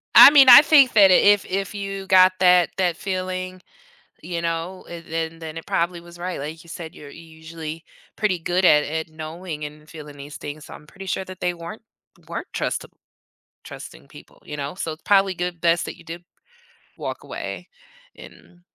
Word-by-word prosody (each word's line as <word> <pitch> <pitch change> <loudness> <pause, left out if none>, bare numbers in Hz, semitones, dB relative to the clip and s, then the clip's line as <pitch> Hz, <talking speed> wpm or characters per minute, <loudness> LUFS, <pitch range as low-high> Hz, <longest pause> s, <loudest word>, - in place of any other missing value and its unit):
I - - +12
mean, 280 -3 +7
I 250 +3 +12
think 290 -4 +5
that 200 -3 +6
if 205 +2 +5
if 195 +1 -3
you 195 -1 -6
got 185 0 +6
that 180 -2 +5
that 180 -3 0
feeling, 185 -1 -4 0.6
you 170 -2 -4
know, 170 +2 -4
it 170 -1 -9
then 165 0 -4
then 160 -1 -8
it 165 - -8
probably 170 +1 -1
was 170 0 -15
right, 180 +1 -5
like 155 +4 -7
you 170 - -18
said, 165 -1 -9
you're 145 - -12
usually 160 0 -10 0.3
pretty 205 -5 -1
good 175 +3 -1
at 150 -3 +5
at 160 +1 -4
knowing 155 0 -7
and 150 +1 -12
feeling 150 -2 -11
these 145 +1 -10
things, 150 0 -8
so, - - -12
I'm 150 - -14
pretty 195 +4 -11
sure 190 0 -3
that 185 -1 -11
they 180 0 0
weren't 175 +6 -9 0.5
weren't - - -6
trusta - - -3 0.8
trusting - - -12
people, - - -17
you 150 - -7
know? 140 +1 -5
So, 165 -3 -4
it's 155 - -13
probably 195 -1 +3
good 175 -1 -4
best 170 0 +2
that - - -7
you - - -16
did 170 +1 -9 0.7
walk - - -6
away, - - -7 0.5
and 175 - -16
175 Hz, 190 wpm, -22 LUFS, 160-185 Hz, 0.8 s, I